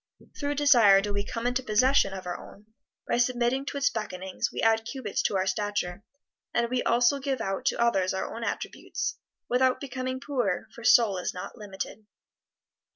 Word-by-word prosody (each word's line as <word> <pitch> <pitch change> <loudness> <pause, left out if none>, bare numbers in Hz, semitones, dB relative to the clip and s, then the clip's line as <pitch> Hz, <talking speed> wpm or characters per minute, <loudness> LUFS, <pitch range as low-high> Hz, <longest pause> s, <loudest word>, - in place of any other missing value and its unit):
Through 290 0 -2
desire 240 -9 +6
do 205 +1 -2
we 200 0 -1
come 230 +3 -5
into 250 +1 +1
possession 255 -1 +3
of 190 -1 -7
our 175 0 -3
own; 205 - -12 0.4
by - - +1
submitting 245 +2 +1
to 285 - -3
its 280 0 +2
beckonings 190 -4 -3
we - - -6
add 225 0 +3
cubits 230 -3 -3
to - - 0
our 190 0 +1
stature; 205 -3 -2 0.5
and 235 0 +1
we 255 -1 +1
also 240 +4 +3
give 270 -1 -2
out 195 0 -3
to - - +1
others 195 -6 +2
our 190 - -3
own 230 - -5
attributes, - - -4 0.3
without 255 +1 +2
becoming 260 -1 -4
poorer, 245 -10 -1
for 235 - -11
soul 225 -4 +5
is 180 - -3
not 180 - -7
limited. 210 0 -7
230 Hz, 180 wpm, -27 LUFS, 200-255 Hz, 0.5 s, desire